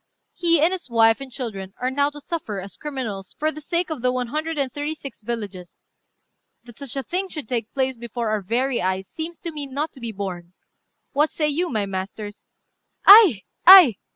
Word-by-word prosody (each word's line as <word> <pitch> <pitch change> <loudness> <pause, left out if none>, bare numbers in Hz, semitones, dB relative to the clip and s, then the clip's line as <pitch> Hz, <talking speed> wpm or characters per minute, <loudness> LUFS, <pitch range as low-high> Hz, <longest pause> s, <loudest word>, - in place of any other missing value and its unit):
He 335 -2 +2
and 325 +3 +4
his 365 -7 -6
wife 225 +1 +4
and 270 -1 -8
children 210 -6 -6
are 255 +1 -1
now 285 +1 +1
to 295 0 -11
suffer 285 - -5
as 195 +1 -9
criminals 235 -10 -6
for 310 +1 0
the 310 - -10
sake 340 +3 -2
of 300 -6 -4
the 250 0 +2
one 250 -1 -2
hundred 310 +3 -3
and 275 -3 -1
thirty 295 +2 -3
six 275 -5 -10
villages. 205 -6 -7 0.8
That 240 +1 -15
such 280 -3 -7
a 270 - -2
thing 375 +5 -3
should 300 -9 -7
take 230 -2 -3
place 265 -1 -1
before 235 -1 -4
our 215 -1 0
very 240 +6 -1
eyes 190 +1 -2
seems 325 +1 -7
to 340 - -5
me 295 -2 -6
not 285 +4 -3
to 265 - -16
be 235 -2 -5
borne. 185 -4 -6 0.6
What 300 +2 +2
say 300 -2 -1
you, 340 +5 -1
my 215 -4 -1
masters?" 200 +2 -7 0.5
"Ay! 390 - +9 0.2
ay! 355 - +10
260 Hz, 205 wpm, -23 LUFS, 215-305 Hz, 0.8 s, ay